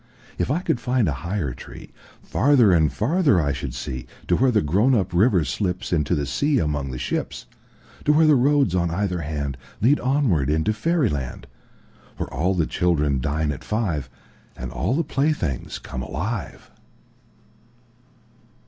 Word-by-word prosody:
If -, -, 0 dB
I 155 Hz, +6 st, +1 dB
could 120 Hz, -, 0 dB
find 125 Hz, -4 st, +1 dB
a -, -, +1 dB
higher 85 Hz, -8 st, -2 dB
treeFarther 120 Hz, -, 0 dB
and 80 Hz, -3 st, +3 dB
farther 140 Hz, -, +2 dB
I 70 Hz, -3 st, 0 dB
should 70 Hz, -3 st, -5 dB
see, 65 Hz, -2 st, -5 dB, 0.2 s
To -, -, +4 dB
where 130 Hz, +1 st, +3 dB
the 110 Hz, -7 st, +2 dB
grown 100 Hz, -, +3 dB
up 95 Hz, -5 st, 0 dB
river 95 Hz, 0 st, +4 dB
slipsInto 85 Hz, -2 st, -1 dB
the 70 Hz, -, -1 dB
sea 145 Hz, -, +1 dB
among 75 Hz, -, -1 dB
the 65 Hz, -, -5 dB
ships. -, -, -3 dB, 0.6 s
To 150 Hz, -, +4 dB
where 160 Hz, +1 st, +5 dB
the 155 Hz, -, +6 dB
roads 140 Hz, -, +3 dB
on 85 Hz, -2 st, +1 dB
either 90 Hz, +1 st, -1 dB
handLead 75 Hz, -, -1 dB
onward 125 Hz, -, +2 dB
into 80 Hz, +8 st, +1 dB
fairy 155 Hz, +3 st, +1 dB
land, 70 Hz, -5 st, -4 dB, 0.7 s
Where -, -, -5 dB
all 90 Hz, +8 st, +1 dB
the 85 Hz, -3 st, +1 dB
children 75 Hz, -7 st, +1 dB
dine 75 Hz, +2 st, 0 dB
at 70 Hz, -, -7 dB
five, 100 Hz, -, -2 dB, 0.5 s
And 60 Hz, 0 st, -6 dB
all 65 Hz, -, -1 dB
the 165 Hz, -, +1 dB
playthings 135 Hz, -, -1 dB
come 65 Hz, -, -7 dB
alive. 95 Hz, -, -5 dB
90 Hz, 155 wpm, -23 LUFS, -, 0.7 s, the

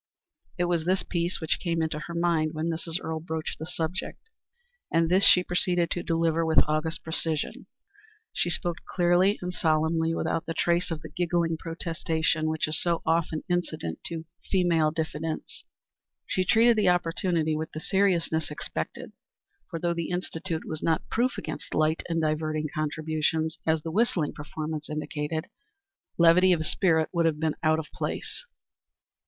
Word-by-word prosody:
It 175 Hz, -, +1 dB
was 175 Hz, -2 st, 0 dB
this 185 Hz, +1 st, +2 dB
piece 170 Hz, 0 st, -1 dB
which 160 Hz, -, 0 dB
came 170 Hz, -2 st, -1 dB
into 160 Hz, -1 st, -2 dB
her 170 Hz, +3 st, -7 dB
mind 165 Hz, -2 st, +1 dB
when 160 Hz, +2 st, -1 dB
Mrs. 165 Hz, 0 st, -2 dB
Earle 160 Hz, -2 st, -3 dB
broached 160 Hz, 0 st, -4 dB
the 160 Hz, -, -5 dB
subject, 180 Hz, -, -4 dB, 0.6 s
and 165 Hz, 0 st, +3 dB
this 185 Hz, +3 st, +4 dB
she 180 Hz, -, +7 dB
proceeded 175 Hz, -1 st, +1 dB
to 175 Hz, -, 0 dB
deliver 165 Hz, -1 st, +1 dB
with 160 Hz, -2 st, +4 dB
august 155 Hz, +2 st, -1 dB
precision. 160 Hz, -1 st, -2 dB, 0.7 s
She 175 Hz, -, 0 dB
spoke 175 Hz, 0 st, -1 dB
clearly 180 Hz, +3 st, +3 dB
and 180 Hz, 0 st, -3 dB
solemnly 160 Hz, 0 st, +1 dB
without 165 Hz, -, -1 dB
the 165 Hz, -, -3 dB
trace 175 Hz, +1 st, +1 dB
of 160 Hz, -3 st, -4 dB
the -, -, -7 dB
giggling 170 Hz, 0 st, 0 dB
protestation 165 Hz, -1 st, -1 dB
which 160 Hz, 0 st, 0 dB
is 155 Hz, -, 0 dB
so 170 Hz, -1 st, 0 dB
often 160 Hz, -1 st, +1 dB
incident 165 Hz, -, -2 dB
to 165 Hz, -1 st, -1 dB, 0.3 s
feminine 170 Hz, -5 st, +3 dB
diffidence. 160 Hz, 0 st, -4 dB, 0.6 s
She 185 Hz, -, 0 dB
treated 230 Hz, +3 st, +5 dB
the 210 Hz, -, +4 dB
opportunity 170 Hz, -2 st, +1 dB
with 160 Hz, +1 st, -4 dB
the 155 Hz, -, -5 dB
seriousness 170 Hz, -4 st, +1 dB
expected, 80 Hz, -, -5 dB, 0.6 s
for 165 Hz, -, -4 dB
though 170 Hz, +1 st, 0 dB
the 170 Hz, -1 st, -3 dB
Institute 165 Hz, -2 st, -3 dB
was 155 Hz, -, -5 dB
not 165 Hz, -1 st, 0 dB
proof 245 Hz, +2 st, +1 dB
against -, -, -5 dB
light 155 Hz, +1 st, +2 dB
and 165 Hz, -1 st, +1 dB
diverting 155 Hz, 0 st, 0 dB
contributions, 155 Hz, +1 st, -1 dB
as 160 Hz, -1 st, +2 dB
the 165 Hz, -, -4 dB
whistling 180 Hz, -6 st, +1 dB
performance 155 Hz, +1 st, -5 dB
indicated, 150 Hz, +1 st, -3 dB, 0.7 s
levity 175 Hz, +2 st, +6 dB
of 160 Hz, -2 st, 0 dB
spirit 160 Hz, -2 st, +2 dB
would 170 Hz, -1 st, +3 dB
have 155 Hz, -2 st, 0 dB
been 160 Hz, -1 st, 0 dB
out 155 Hz, 0 st, +3 dB
of 160 Hz, -, -3 dB
place. -, -, -4 dB
165 Hz, 160 wpm, -27 LUFS, 155-175 Hz, 0.7 s, she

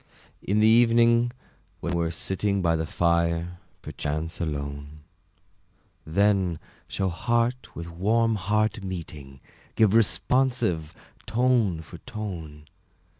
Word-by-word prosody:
In 105 Hz, +2 st, +1 dB
the 110 Hz, -, +6 dB
evening, 115 Hz, +1 st, +4 dB, 0.5 s
when 85 Hz, -, -3 dB
we're 85 Hz, -1 st, 0 dB
sitting 95 Hz, +3 st, -1 dB
By 85 Hz, -1 st, +3 dB
the 80 Hz, 0 st, -2 dB
fire, 85 Hz, +1 st, 0 dB, 0.2 s
perchance 75 Hz, +2 st, -4 dB
alone, 70 Hz, -1 st, -5 dB, 1.1 s
Then 95 Hz, 0 st, +2 dB, 0.3 s
shall 95 Hz, -1 st, -1 dB
heart 120 Hz, +7 st, -1 dB
with 85 Hz, 0 st, -6 dB
warm 110 Hz, +7 st, +1 dB
heart 105 Hz, +1 st, 0 dB
meeting, 75 Hz, -7 st, -7 dB, 0.3 s
Give 110 Hz, -3 st, +4 dB
responsive 115 Hz, -, +1 dB, 0.3 s
tone 115 Hz, -6 st, +2 dB
for 85 Hz, +1 st, -12 dB
tone. 90 Hz, -11 st, -7 dB
95 Hz, 105 wpm, -26 LUFS, 80-110 Hz, 1.1 s, the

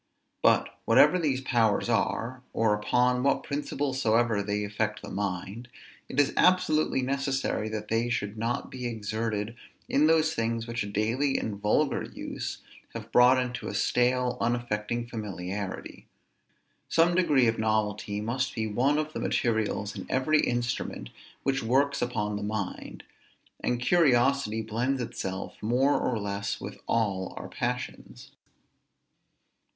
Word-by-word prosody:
But, -, -, +2 dB
whatever 180 Hz, -, +6 dB
these 140 Hz, -6 st, 0 dB
powers 115 Hz, -6 st, +2 dB
are, 120 Hz, +2 st, 0 dB
or 110 Hz, -1 st, +2 dB
upon 125 Hz, +4 st, +2 dB
what 140 Hz, +1 st, +2 dB
principle 140 Hz, -1 st, -2 dB
soever 115 Hz, -4 st, +2 dB
they 105 Hz, +1 st, -1 dB
affect 105 Hz, +1 st, -2 dB
the -, -, -7 dB
mind, 100 Hz, +4 st, -4 dB, 0.4 s
it 135 Hz, -, -2 dB
is 145 Hz, -, +3 dB
absolutely 155 Hz, -7 st, +3 dB
necessary 135 Hz, -4 st, -1 dB
that 105 Hz, -1 st, -4 dB
they 115 Hz, +2 st, +1 dB
should 105 Hz, -3 st, -2 dB
not 115 Hz, +2 st, -2 dB
be 125 Hz, -1 st, -4 dB
exerted 110 Hz, 0 st, -3 dB, 0.3 s
in 150 Hz, +2 st, +3 dB
those 160 Hz, 0 st, +3 dB
things 115 Hz, 0 st, -1 dB
which 115 Hz, 0 st, -3 dB
a 105 Hz, -, -2 dB
daily 115 Hz, +7 st, 0 dB
and 100 Hz, -2 st, -4 dB
vulgar 105 Hz, 0 st, +2 dB
use -, -, -6 dB, 0.3 s
have 115 Hz, 0 st, -7 dB
brought 125 Hz, +2 st, +6 dB
into 125 Hz, -1 st, -2 dB
a -, -, -4 dB
stale 125 Hz, 0 st, +1 dB
unaffecting 120 Hz, -1 st, -1 dB
familiarity. 100 Hz, -4 st, -5 dB, 0.8 s
Some 165 Hz, +1 st, +4 dB
degree 150 Hz, -8 st, +4 dB
of 115 Hz, -1 st, +1 dB
novelty 105 Hz, -1 st, 0 dB
must 130 Hz, +5 st, -2 dB
be 110 Hz, -, -1 dB
one 125 Hz, +8 st, +1 dB
of 155 Hz, 0 st, -2 dB
the -, -, -4 dB
materials 110 Hz, -3 st, 0 dB
in -, -, -7 dB
every 150 Hz, +4 st, +2 dB
instrument 120 Hz, -, -2 dB, 0.3 s
which 135 Hz, 0 st, +1 dB
works 140 Hz, +5 st, +2 dB
upon 105 Hz, -4 st, -1 dB
the -, -, -5 dB
mind; 105 Hz, -2 st, -4 dB, 0.6 s
and 120 Hz, -, -1 dB
curiosity 130 Hz, -6 st, +3 dB
blends 120 Hz, +5 st, -1 dB
itself 95 Hz, -5 st, -5 dB
more 125 Hz, +6 st, +2 dB
or 120 Hz, -, 0 dB
less 100 Hz, -1 st, -3 dB
with -, -, -8 dB
all 100 Hz, -5 st, 0 dB
our -, -, -6 dB
passions. -, -, -5 dB
115 Hz, 140 wpm, -28 LUFS, 105-130 Hz, 0.8 s, whatever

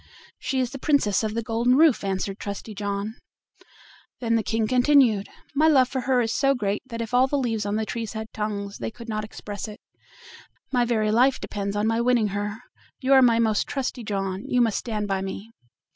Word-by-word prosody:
"She 265 Hz, -, -1 dB
is 255 Hz, -1 st, 0 dB
the 275 Hz, -, -7 dB
Princess 255 Hz, -10 st, +2 dB
of 215 Hz, 0 st, -2 dB
the 230 Hz, -, -1 dB
Golden 235 Hz, +2 st, +2 dB
Roof," 310 Hz, -7 st, +5 dB
answered 195 Hz, 0 st, -2 dB
Trusty 205 Hz, +2 st, -6 dB
John. 205 Hz, +2 st, -3 dB, 1.0 s
Then 230 Hz, -2 st, 0 dB
the 230 Hz, -, +3 dB
King 225 Hz, 0 st, -1 dB
continued: 250 Hz, -4 st, +4 dB, 0.2 s
"My 305 Hz, +3 st, +4 dB
love 265 Hz, -5 st, +5 dB
for 260 Hz, -, -2 dB
her 255 Hz, -2 st, +4 dB
is 225 Hz, -1 st, -1 dB
so 275 Hz, 0 st, +2 dB
great 205 Hz, -4 st, -1 dB
that 230 Hz, -2 st, -4 dB
if 225 Hz, -, -9 dB
all 255 Hz, +1 st, +5 dB
the 285 Hz, -, 0 dB
leaves 225 Hz, -6 st, -1 dB
on 205 Hz, -, -1 dB
the 220 Hz, 0 st, -1 dB
trees 230 Hz, 0 st, -4 dB
had 220 Hz, 0 st, -6 dB
tongues 205 Hz, -2 st, -4 dB
they -, -, -3 dB
could 235 Hz, +1 st, -12 dB
not 215 Hz, -1 st, -2 dB
express 210 Hz, -1 st, -7 dB
it; 210 Hz, -, -10 dB, 0.9 s
my 245 Hz, -2 st, +2 dB
very 215 Hz, -3 st, +1 dB
life 250 Hz, +4 st, +3 dB
depends 200 Hz, -1 st, -4 dB
on 210 Hz, +1 st, 0 dB
my 225 Hz, +1 st, +1 dB
winning 235 Hz, -3 st, +2 dB
her. 205 Hz, +3 st, -4 dB, 0.4 s
You 265 Hz, +1 st, +2 dB
are 265 Hz, -, +8 dB
my 235 Hz, -2 st, +5 dB
most 220 Hz, -2 st, +1 dB
trusty 260 Hz, -3 st, -3 dB
John: 195 Hz, -2 st, -3 dB
you 250 Hz, -, +1 dB
must 230 Hz, -4 st, +2 dB
stand 215 Hz, -3 st, -3 dB
by 195 Hz, -1 st, -1 dB
me." 195 Hz, +3 st, -6 dB
225 Hz, 210 wpm, -25 LUFS, 205-250 Hz, 1.0 s, are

